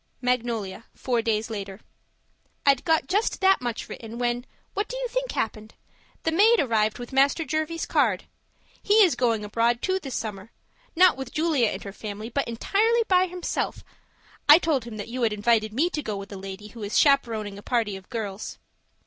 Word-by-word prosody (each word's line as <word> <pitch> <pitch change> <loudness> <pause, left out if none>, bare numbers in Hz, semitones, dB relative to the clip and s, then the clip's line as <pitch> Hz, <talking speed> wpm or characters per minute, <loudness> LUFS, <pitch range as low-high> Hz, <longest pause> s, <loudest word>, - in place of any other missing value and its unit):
MAGNOLIA, 230 -5 -2
Four 245 -3 0
days 225 -1 -1
later 200 -2 -6 0.9
I'd 275 -2 +4
got 320 -1 +2
just 410 +4 0
that 385 -4 +4
much 240 -2 -4
written, 225 0 -8
when 245 +1 -1 0.3
what 405 +2 -1
do - - -5
you - - -2
think - - -2
happened? 215 0 -3 0.5
The 325 - +1
maid 435 +7 +5
arrived 220 -4 +1
with 245 +2 -8
Master 280 +4 +3
Jervie's 315 +1 -2
card. 230 - +1 0.6
He 415 - +2
is 360 - +4
going 230 -4 0
abroad 230 +3 +1
too 375 0 +1
this 270 -8 -6
summer; 210 -2 -5 0.5
not 360 -3 +6
with 265 -2 -6
Julia 310 -7 +2
and 190 -1 -4
her 200 - -7
family, 215 +1 -6
but 275 +3 -1
entirely 435 - +2
by 370 0 +4
himself 360 0 -3 0.7
I 295 - +11
told 305 -8 0
him 230 -2 -8
that 205 - -6
you 250 +2 -5
had 225 -2 +2
invited 215 0 +2
me 280 +10 +2
to 300 - -2
go 215 -7 -4
with 195 +1 -8
a - - -6
lady 195 +2 -8
who 230 +1 -11
is 205 0 -1
chaperoning 225 -8 +2
a - - -11
party 225 -3 0
of 190 -1 -12
girls. 210 -3 -5
240 Hz, 190 wpm, -25 LUFS, 215-315 Hz, 0.9 s, I